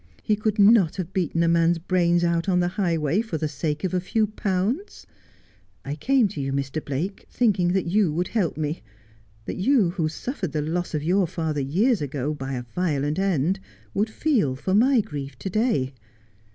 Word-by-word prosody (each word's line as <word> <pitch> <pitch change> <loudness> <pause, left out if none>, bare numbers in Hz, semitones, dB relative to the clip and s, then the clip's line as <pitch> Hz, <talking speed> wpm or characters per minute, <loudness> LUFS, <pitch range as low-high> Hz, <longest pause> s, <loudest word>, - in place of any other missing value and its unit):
He 215 - +2
could 215 0 -1
not 200 -5 +5
have 185 -1 -5
beaten 170 -3 0
a - - +2
man's 170 0 +3
brains 175 0 +2
out 170 +2 +1
on 180 -1 +3
the 175 0 +1
highway 170 -2 0
for 220 -8 -4
the 155 - -1
sake 150 +1 -3
of 185 - -1
a 180 - +2
few 220 +4 +1
pounds. 210 - -2 0.8
I 140 - -3
came 245 - +2
to 150 - -5
you, 135 0 -2
Mr. 140 +2 -2
Blake, 160 +8 -4
thinking 195 -7 +2
that 190 -2 +1
you 185 0 +2
would 175 +4 -1
help 195 -10 0
me; 155 +1 -2 0.6
that - - -5
you 205 -3 +3
who 165 -4 -1
suffered 185 - -5
the 150 - 0
loss 170 +2 -2
of 150 - -2
your 180 +3 +2
father 160 -4 -2
years 195 - +2
ago, 145 +1 -2
by 135 -2 -5
a 125 -1 -3
violent 150 -3 0
end, 190 -1 +1 0.3
would 210 +2 0
feel 220 - +1
for 185 +8 -2
my 245 +4 +5
grief 140 -7 -7
to 190 - -5
day. 180 - +1
175 Hz, 190 wpm, -24 LUFS, 150-200 Hz, 0.8 s, not